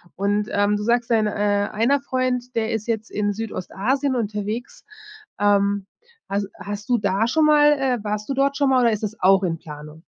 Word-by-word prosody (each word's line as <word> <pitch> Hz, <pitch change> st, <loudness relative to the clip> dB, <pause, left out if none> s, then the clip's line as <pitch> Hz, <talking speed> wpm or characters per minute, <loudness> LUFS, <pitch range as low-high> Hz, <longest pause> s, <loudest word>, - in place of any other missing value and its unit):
Und, 205 Hz, +2 st, 0 dB
ähm, 205 Hz, 0 st, +2 dB
du 210 Hz, -, -3 dB
sagst 235 Hz, +1 st, +1 dB
dein, 220 Hz, -2 st, +2 dB
äh, 205 Hz, -1 st, 0 dB
einer 240 Hz, +6 st, +1 dB
Freund, 255 Hz, -2 st, -2 dB
der 225 Hz, 0 st, 0 dB
ist 220 Hz, 0 st, -3 dB
jetzt 225 Hz, -1 st, -2 dB
in 205 Hz, 0 st, -1 dB
Südostasien 225 Hz, +6 st, -2 dB
unterwegs. 215 Hz, +1 st, -4 dB, 0.5 s
Ähm, 200 Hz, -1 st, +2 dB, 0.4 s
has 200 Hz, +1 st, -1 dB
hast 205 Hz, +4 st, -7 dB
du 245 Hz, -, +3 dB
da 200 Hz, +1 st, +1 dB
schon 310 Hz, +5 st, +2 dB
mal, 295 Hz, -1 st, +6 dB
äh, 260 Hz, -3 st, 0 dB
warst 210 Hz, 0 st, -3 dB
du -, -, 0 dB
dort 275 Hz, +1 st, +1 dB
schon 280 Hz, -2 st, +2 dB
mal 260 Hz, -1 st, +4 dB
oder 235 Hz, -1 st, +4 dB
ist 215 Hz, 0 st, -3 dB
das 215 Hz, +1 st, -4 dB
auch 195 Hz, +1 st, +5 dB
in 165 Hz, -3 st, -1 dB
Planung? 150 Hz, 0 st, -11 dB
215 Hz, 195 wpm, -22 LUFS, 205-245 Hz, 0.5 s, mal